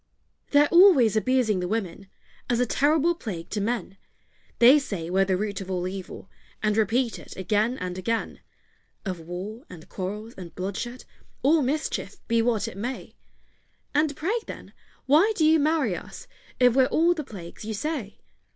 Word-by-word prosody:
They're 290 Hz, 0 st, +5 dB
always 340 Hz, -, +6 dB
abusing 220 Hz, -3 st, +2 dB
the 180 Hz, -, -2 dB
women, 195 Hz, -2 st, -3 dB, 0.4 s
As 240 Hz, -1 st, +1 dB
a 250 Hz, -, +3 dB
terrible 300 Hz, +7 st, +2 dB
plague 190 Hz, -, -7 dB
to 210 Hz, -, -1 dB
men: 215 Hz, -3 st, -3 dB, 0.6 s
They 255 Hz, +5 st, +7 dB
say 180 Hz, -, -5 dB
we're 195 Hz, +1 st, +3 dB
the 190 Hz, -1 st, +1 dB
root 205 Hz, 0 st, -3 dB
of 190 Hz, -, -8 dB
all 180 Hz, -1 st, -2 dB
evil, 190 Hz, 0 st, -7 dB, 0.4 s
And 210 Hz, -1 st, +2 dB
repeat 225 Hz, +3 st, +1 dB
it -, -, -12 dB
again 215 Hz, +6 st, 0 dB
and 180 Hz, 0 st, -5 dB
again; 230 Hz, +4 st, -2 dB, 0.7 s
Of 185 Hz, -3 st, -3 dB
war, 185 Hz, -, -7 dB
and 165 Hz, -3 st, -12 dB
quarrels, 210 Hz, +4 st, -5 dB
and 175 Hz, -3 st, -10 dB
bloodshed, 200 Hz, +7 st, -5 dB, 0.4 s
All 305 Hz, +3 st, +4 dB
mischief, 290 Hz, +4 st, -2 dB
be 230 Hz, -1 st, +2 dB
what 225 Hz, -2 st, 0 dB
it -, -, -8 dB
may! 245 Hz, +6 st, -5 dB, 0.8 s
And 295 Hz, 0 st, +1 dB
pray, 335 Hz, +8 st, -1 dB
then, -, -, -9 dB, 0.3 s
why 320 Hz, +11 st, +4 dB
do 315 Hz, -, +2 dB
you 320 Hz, +1 st, +5 dB
marry 295 Hz, -, +1 dB
us, -, -, -9 dB, 0.3 s
If 250 Hz, -2 st, +5 dB
we're 260 Hz, -1 st, +5 dB
all 335 Hz, +5 st, +3 dB
the 310 Hz, -3 st, -5 dB
plagues 185 Hz, -8 st, -10 dB
you 220 Hz, 0 st, -4 dB
say? 260 Hz, -4 st, -4 dB
225 Hz, 170 wpm, -25 LUFS, 195-280 Hz, 0.8 s, They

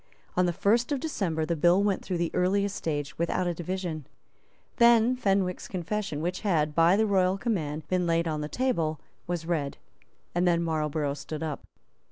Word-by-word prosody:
On 180 Hz, 0 st, +3 dB
the -, -, +2 dB
first 230 Hz, -, +1 dB
of 285 Hz, -, +1 dB
December 180 Hz, -, -1 dB
the 170 Hz, -, -1 dB
bill 175 Hz, +5 st, +4 dB
went 200 Hz, -2 st, 0 dB
through 180 Hz, -, -2 dB
the 170 Hz, -1 st, -1 dB
earliest 200 Hz, +2 st, +1 dB
stage 145 Hz, -3 st, -3 dB
without 170 Hz, +2 st, 0 dB
a 175 Hz, -, 0 dB
division. 170 Hz, -3 st, -4 dB, 0.7 s
Then 235 Hz, 0 st, +5 dB
Fenwick's 195 Hz, -6 st, 0 dB
confession, 185 Hz, -3 st, -3 dB
which 180 Hz, +2 st, -2 dB
had, 155 Hz, -7 st, +1 dB
by 165 Hz, +3 st, +5 dB
the 220 Hz, +2 st, +3 dB
royal 190 Hz, -2 st, +2 dB
command, 160 Hz, -10 st, -2 dB
been 180 Hz, -1 st, 0 dB
laid 165 Hz, 0 st, +1 dB
on 155 Hz, -1 st, -2 dB
the 150 Hz, -, -4 dB
table, 165 Hz, -, 0 dB, 0.3 s
was 175 Hz, -2 st, -3 dB
read; 155 Hz, -5 st, -2 dB, 0.6 s
and 175 Hz, +1 st, +2 dB
then 170 Hz, -1 st, +3 dB
Marlborough 150 Hz, -3 st, -1 dB
stood 150 Hz, +2 st, -6 dB
up. 155 Hz, -3 st, -5 dB
175 Hz, 180 wpm, -28 LUFS, 160-195 Hz, 0.7 s, Then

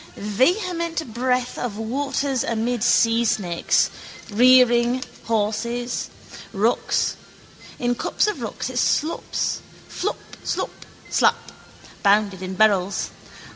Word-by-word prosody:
Vehement 330 Hz, -, 0 dB
breath 250 Hz, +1 st, 0 dB
of 230 Hz, -4 st, -3 dB
waters 270 Hz, +3 st, -1 dB
amid 230 Hz, +1 st, -1 dB
seasnakes, 225 Hz, -6 st, +2 dB, 0.4 s
rearing 245 Hz, +1 st, +5 dB, 0.2 s
horses, 235 Hz, +2 st, -1 dB, 0.4 s
rocks. 220 Hz, +5 st, +1 dB, 0.6 s
In 245 Hz, 0 st, 0 dB
cups -, -, 0 dB
of 425 Hz, -, -2 dB
rocks -, -, -4 dB
it -, -, -1 dB
slops: 315 Hz, +2 st, 0 dB, 0.3 s
flop, 410 Hz, -, -3 dB, 0.3 s
slop, -, -, -4 dB, 0.2 s
slap: -, -, +2 dB, 0.5 s
bounded 200 Hz, -2 st, +2 dB
in 185 Hz, 0 st, -5 dB
barrels. 200 Hz, -2 st, +2 dB
235 Hz, 95 wpm, -23 LUFS, 215-255 Hz, 0.6 s, rearing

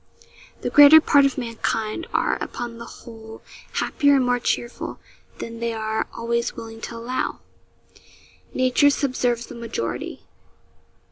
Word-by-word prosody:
The -, -, -3 dB
greater 290 Hz, +2 st, +9 dB
part 285 Hz, -2 st, +4 dB
of 275 Hz, -, -5 dB
mankind 230 Hz, +2 st, -3 dB
are, -, -, 0 dB
upon 235 Hz, -1 st, -5 dB
the 235 Hz, -, -7 dB
whole, 225 Hz, -1 st, -12 dB, 0.3 s
happier 285 Hz, -1 st, +2 dB
and 265 Hz, -2 st, +3 dB
more 245 Hz, 0 st, +1 dB
cheerful 240 Hz, 0 st, -3 dB, 0.4 s
than 230 Hz, 0 st, -7 dB
they 235 Hz, 0 st, -2 dB
are 220 Hz, 0 st, -2 dB
always 235 Hz, 0 st, -1 dB
willing 225 Hz, 0 st, -9 dB
to 235 Hz, -, -6 dB
allow. 240 Hz, +3 st, -3 dB, 1.1 s
Nature 255 Hz, +3 st, +3 dB
subserves 250 Hz, -4 st, 0 dB
the -, -, -11 dB
majority. 230 Hz, -, -5 dB
235 Hz, 130 wpm, -23 LUFS, 230-255 Hz, 1.1 s, greater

